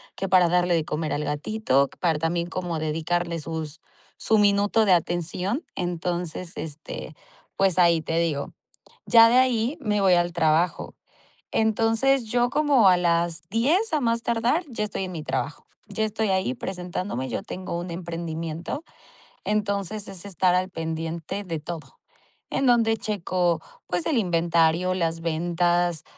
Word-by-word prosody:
que 195 - -3
para 180 -1 +5
darle 180 0 +2
de 160 -2 0
comer 155 0 -3
al 150 - -1
gatito, 145 -3 +1
para 165 -4 +1
también 170 +2 -1
como 175 -3 -3
dedicarle 165 +2 -1
sus 160 0 -5 0.4
su 220 - +2
minuto 205 +1 +3
de 190 - +5
atención. 175 - -1
Entonces 175 0 -3
este, 155 0 -7 0.4
pues 190 -2 +3
ahí 170 -2 +5
te 165 +1 -2
digo, 155 -4 -1 0.5
ya 230 -1 +8
de 250 - +5
ahí 255 +3 +2
me 210 -4 0
voy 190 -2 +5
al 175 0 +1
trabajo. 160 +1 +1 0.6
Entonces 225 +4 +2
yo 240 +2 +1
como 280 -7 +4
a 180 - +6
las 170 -2 +1
10 315 - +2
a 305 - +2
más 230 -2 +1
tardar 235 +10 +1
ya 215 -2 -2
estoy 195 -2 -3
en 185 - -6
mi 160 - -5
trabajo. 135 +2 -3 0.2
Ya 220 +2 -1
estoy 215 0 -1
ahí 190 +7 0
presentándome. 180 - -4
Yo - - -3
tengo 185 -3 -5
un 175 0 -5
emprendimiento. 170 - -5 0.6
Entonces 205 0 -1
es 195 -1 -9
estar 185 -2 +1
al 185 +1 0
pendiente 165 +3 -4
de 165 -3 -3
todo, 165 0 -8 0.5
en 270 - 0
donde 230 -2 +4
checo, 180 -5 -1 0.3
pues 175 -1 -2
el 280 - +1
inventario, 170 -1 +2
las 165 -2 -1
ventas, 175 0 0
180 Hz, 150 wpm, -25 LUFS, 165-215 Hz, 0.6 s, ya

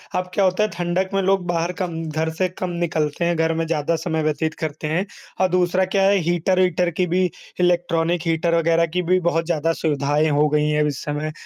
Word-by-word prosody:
अब 180 0 -1
क्या 200 - +2
होता 185 +3 +2
है 215 - 0
ठंडक 175 +2 -1
में 195 - +2
लोग 190 -1 +1
बाहर 170 0 0
कम 165 -3 -3
घर 160 +1 -1
से 185 +3 0
कम 185 0 -5
निकलते 170 -2 -1
हैं, 170 0 +1
घर 160 0 +1
में 165 0 -1
ज़्यादा 165 0 0
समय 160 -1 -2
व्यतीत 155 +1 -1
करते 155 -1 -4
हैं। 175 +6 0 0.4
और 185 - +5
दूसरा 180 +1 +2
क्या 195 +1 +1
है 200 +1 +4
हीटर-वीटर 180 0 +2
की 180 +2 -1
भी, 180 +2 +2 0.3
इलेक्ट्रॉनिक 175 -1 +1
हीटर 165 +1 +1
वग़ैरह 165 0 +3
की 180 - +1
भी 185 +2 +2
बहुत 165 -1 0
ज़्यादा 165 -1 0
सुविधाएँ 150 0 +1
हो 150 +1 +3
गई 150 0 +1
हैं 150 0 +1
अब 150 - +2
इस 145 - -4
समय, 150 +1 -3
170 Hz, 220 wpm, -21 LUFS, 155-180 Hz, 0.4 s, और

